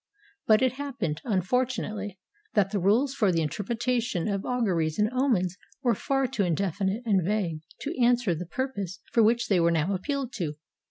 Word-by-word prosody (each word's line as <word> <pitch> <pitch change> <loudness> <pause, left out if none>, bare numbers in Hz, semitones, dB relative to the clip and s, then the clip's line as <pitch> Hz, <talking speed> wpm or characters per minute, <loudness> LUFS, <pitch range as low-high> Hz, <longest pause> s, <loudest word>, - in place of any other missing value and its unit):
But 220 +3 +5
it 260 - +4
happened, 260 - -3
unfortunately, 210 -1 -1 0.4
that 195 -2 +3
the 205 - 0
rules 225 +9 +3
for 215 -8 +2
the 165 -2 +1
interpretation 225 - -1
of 200 -2 -1
auguries 180 -11 0
and 210 +2 +2
omens 215 -9 +1 0.3
were 240 -2 +4
far 270 +5 0
too 255 -3 -2
indefi 190 +1 0
nite 210 +6 -2
and 195 -5 +3
vague 180 -4 -1 0.2
to 295 - -3
answer 240 -5 +3
the 170 +2 -5
purpose 200 -5 -3
for 230 - +4
which 235 +2 +3
they 190 -3 +3
were 170 0 +4
now 170 +3 +1
appealed 270 +6 -2
to. 155 -6 -2
210 Hz, 175 wpm, -27 LUFS, 180-245 Hz, 0.4 s, But